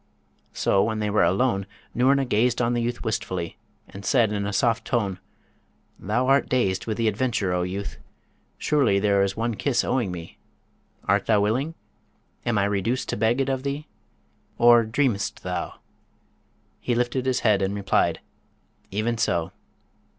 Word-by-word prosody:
So 95 Hz, -, +2 dB
when 110 Hz, 0 st, -1 dB
they 105 Hz, -1 st, -1 dB
were 105 Hz, -, +3 dB
alone 100 Hz, -1 st, +1 dB, 0.3 s
Noorna 135 Hz, +3 st, +3 dB
gazed 120 Hz, +1 st, +1 dB
on 120 Hz, 0 st, +1 dB
the 120 Hz, -, 0 dB
youth 120 Hz, +1 st, -3 dB
wistfully, 95 Hz, -5 st, -3 dB, 0.3 s
and 100 Hz, -, -11 dB
said 110 Hz, +1 st, +3 dB
in 100 Hz, -1 st, -2 dB
a -, -, -2 dB
soft 115 Hz, +3 st, +1 dB
tone, 105 Hz, -7 st, -1 dB, 0.8 s
'Thou 115 Hz, +6 st, 0 dB
art 135 Hz, +2 st, +3 dB
dazed 95 Hz, -7 st, 0 dB
with 110 Hz, -, -2 dB
the 115 Hz, -1 st, +1 dB
adventure, 110 Hz, -4 st, 0 dB
O 90 Hz, -, 0 dB
youth! 95 Hz, +3 st, -4 dB, 0.6 s
Surely 135 Hz, -10 st, +2 dB
there 100 Hz, 0 st, +3 dB
is 100 Hz, +1 st, 0 dB
one 115 Hz, +1 st, -1 dB
kiss 125 Hz, +3 st, 0 dB
owing 120 Hz, -7 st, 0 dB
me: 85 Hz, -2 st, -9 dB, 0.6 s
art -, -, +1 dB
thou 105 Hz, -, +4 dB
willing? 130 Hz, +10 st, 0 dB, 0.7 s
Am 115 Hz, -3 st, +2 dB
I 100 Hz, -, +3 dB
reduced 100 Hz, +5 st, -1 dB
to -, -, -1 dB
beg 110 Hz, +4 st, +1 dB
it 135 Hz, -, 0 dB
of 135 Hz, -1 st, -1 dB
thee? 140 Hz, +2 st, -4 dB, 0.7 s
Or 120 Hz, 0 st, +6 dB
dream'st 115 Hz, -2 st, -1 dB
thou?' -, -, -3 dB, 1.0 s
He 120 Hz, -, -1 dB
lifted 125 Hz, +2 st, -1 dB
his 130 Hz, -, +1 dB
head 105 Hz, -3 st, +3 dB
and 95 Hz, +1 st, -1 dB
replied, 100 Hz, -1 st, +1 dB, 0.7 s
'Even 110 Hz, +3 st, -1 dB
so.' 85 Hz, -7 st, 0 dB
110 Hz, 160 wpm, -24 LUFS, 100-125 Hz, 1.0 s, Or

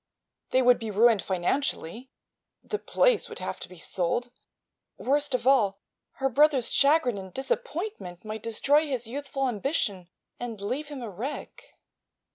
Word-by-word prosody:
They 260 Hz, 0 st, +3 dB
would 250 Hz, 0 st, +5 dB
be 225 Hz, -2 st, -4 dB
ruined 220 Hz, +1 st, +4 dB
financially; 220 Hz, -, -2 dB, 0.5 s
the 425 Hz, -, -3 dB
place -, -, +2 dB
would -, -, -7 dB
have -, -, -4 dB
to -, -, -7 dB
be 180 Hz, -, -12 dB
sold; 190 Hz, +9 st, -1 dB, 0.7 s
worst 285 Hz, 0 st, +1 dB
of 250 Hz, -, -3 dB
all, 220 Hz, -8 st, +4 dB, 0.4 s
her 270 Hz, -, 0 dB
brother's 275 Hz, -1 st, +3 dB
chagrin 280 Hz, -7 st, +4 dB
and 190 Hz, -1 st, -9 dB
disappointment 270 Hz, -, -4 dB
might 215 Hz, 0 st, -5 dB
destroy 285 Hz, +8 st, +2 dB
his 255 Hz, -4 st, -2 dB
youthful 270 Hz, +2 st, -3 dB
ambition 210 Hz, -, -1 dB, 0.3 s
and 235 Hz, -3 st, -5 dB
leave 250 Hz, +9 st, -3 dB
him 285 Hz, -4 st, -7 dB
a 230 Hz, -, -5 dB
wreck. 245 Hz, +11 st, -7 dB
250 Hz, 145 wpm, -27 LUFS, 210-280 Hz, 0.7 s, would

